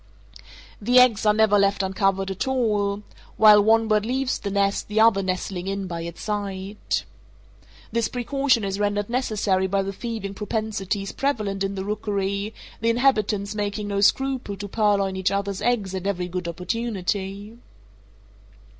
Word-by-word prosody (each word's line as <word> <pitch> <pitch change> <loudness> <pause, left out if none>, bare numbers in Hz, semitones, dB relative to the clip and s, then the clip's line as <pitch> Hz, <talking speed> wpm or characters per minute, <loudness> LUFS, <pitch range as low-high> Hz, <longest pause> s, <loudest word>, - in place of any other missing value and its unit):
The 245 +5 +3
eggs 230 -4 +5
are 210 - +6
never 215 -2 +4
left 200 0 +2
uncovered 195 0 0
at 190 +7 -3
all—while 210 -3 +2
one 225 +1 +4
bird 215 -1 +2
leaves 255 +3 -1
the 200 - -4
nest 200 0 0
the 210 +1 0
other 220 -3 +5
nestling 185 0 -3
in 195 0 -2
by 170 -2 -5
its 170 0 -7
side. 200 -1 -3 0.9
This 230 -1 +1
precaution 255 -1 +1
is 195 0 -2
rendered 205 +1 -1
necessary 210 -6 0
by 195 +1 0
the 195 +1 -4
thieving 220 -2 -5
propensities 205 -1 -3
prevalent 210 -8 -1
in 195 0 -2
the 190 0 -4
rookery, 200 0 -2 0.3
the 230 - +1
inhabitants 215 -5 +1
making 205 0 -3
no 200 0 0
scruple 260 -2 +1
to 205 +1 -6
purloin 200 -2 +1
each 190 -1 +1
other's 200 0 -2
eggs 215 -6 0
at 190 0 -3
every 180 -3 -1
good 180 0 -4
opportunity. 200 +2 -3
205 Hz, 150 wpm, -24 LUFS, 195-220 Hz, 0.9 s, are